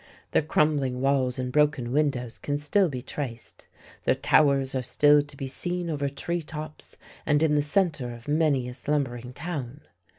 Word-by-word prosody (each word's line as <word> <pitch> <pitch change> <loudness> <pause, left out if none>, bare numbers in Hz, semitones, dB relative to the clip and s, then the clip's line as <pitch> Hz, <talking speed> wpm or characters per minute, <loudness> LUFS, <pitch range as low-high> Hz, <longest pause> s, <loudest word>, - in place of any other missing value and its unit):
Their - - +3
crumbling 150 -4 +1
walls 135 -1 +1
and 125 -1 -3
broken 145 -4 +2
windows 130 -5 0
can 145 0 -2
still 170 +6 +2
be 125 -3 -5
traced, 125 -5 -6 0.4
their - - +3
towers 135 -1 +3
are 130 - 0
still 145 +3 +4
to 145 -1 -11
be 135 - -4
seen 175 +5 -3
over 140 -2 -1
tree 170 +5 -3
tops 155 0 -9 0.3
and 150 +1 +2
in 155 -2 +3
the 150 - +3
centre 150 -5 0
of 120 -1 -11
many 145 -4 +2
a 125 - -6
slumbering 125 -3 -2
town. 145 -2 -5
145 Hz, 170 wpm, -26 LUFS, 130-150 Hz, 0.4 s, still